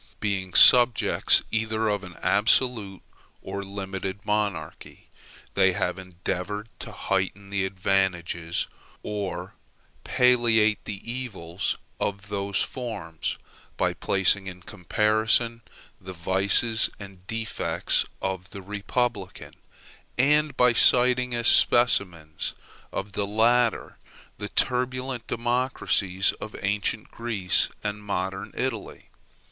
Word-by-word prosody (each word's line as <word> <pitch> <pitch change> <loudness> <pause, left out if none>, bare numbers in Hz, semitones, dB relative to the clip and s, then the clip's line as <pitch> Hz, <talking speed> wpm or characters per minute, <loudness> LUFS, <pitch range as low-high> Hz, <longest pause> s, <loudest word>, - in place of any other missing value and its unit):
Being 95 -3 -2
subjects 120 -2 +6
either 110 0 0
of 105 -2 -1
an 90 -2 -10
absolute 105 -1 +2 0.4
or 100 +1 -5
limited 95 0 -6
monarchy, 105 -7 -3 0.4
they - - +3
have - - -2
endeavored 95 +3 -5
to - - -6
heighten 100 +1 -2
the 95 -1 0
advantages, 90 -3 -1 0.4
or 100 -2 -4 0.5
palliate 115 -4 +3
the 100 -2 -5
evils 100 -8 -3 0.2
of 100 +1 -3
those 100 -2 -1
forms, 100 -11 -5 0.4
by - - +1
placing 95 0 +2
in 90 -1 -8
comparison 110 +5 +1 0.4
the 95 0 -9
vices 95 +6 +2
and 95 -2 -12
defects 115 -2 -1 0.2
of 95 -1 -3
the 100 - -9
republican, 105 +5 -3 0.6
and 150 +2 +3
by 125 -1 +5
citing 125 +1 +5
as 120 0 +1
specimens 90 -10 +3 0.4
of 100 +1 -4
the 100 +1 -2
latter 115 +3 +1 0.4
the 105 - -5
turbulent 125 -1 -1
democracies 120 -6 +1
of 110 - -7
ancient 105 +2 -1
Greece 110 -6 0
and 105 0 -3
modern 95 -1 -3
Italy. 125 -5 -4
105 Hz, 105 wpm, -25 LUFS, 95-115 Hz, 0.6 s, subjects